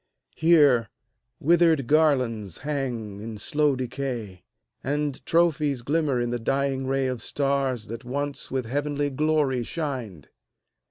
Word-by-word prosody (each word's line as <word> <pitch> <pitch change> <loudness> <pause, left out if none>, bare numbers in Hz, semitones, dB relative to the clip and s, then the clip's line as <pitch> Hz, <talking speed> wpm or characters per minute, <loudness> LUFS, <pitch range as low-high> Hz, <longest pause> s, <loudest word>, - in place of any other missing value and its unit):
Here, 145 -9 +4 0.5
withered 165 -3 +4
garlands 125 - +2
hang 120 -9 -3
in 110 0 -6
slow 150 +4 +1
decay, 120 -6 -4 0.4
And 145 0 -2
trophies 155 -6 +2
glimmer 145 -2 +1
in 120 0 -1
the 120 - -2
dying 135 +2 0
ray 135 0 +1
Of 125 -3 -2
stars 135 -4 -1
that 115 +3 -7
once 140 +2 -4
with 130 -2 -2
heavenly 145 +3 -1
glory 150 -2 +1
shined. 120 - -5
135 Hz, 120 wpm, -25 LUFS, 120-145 Hz, 0.5 s, Here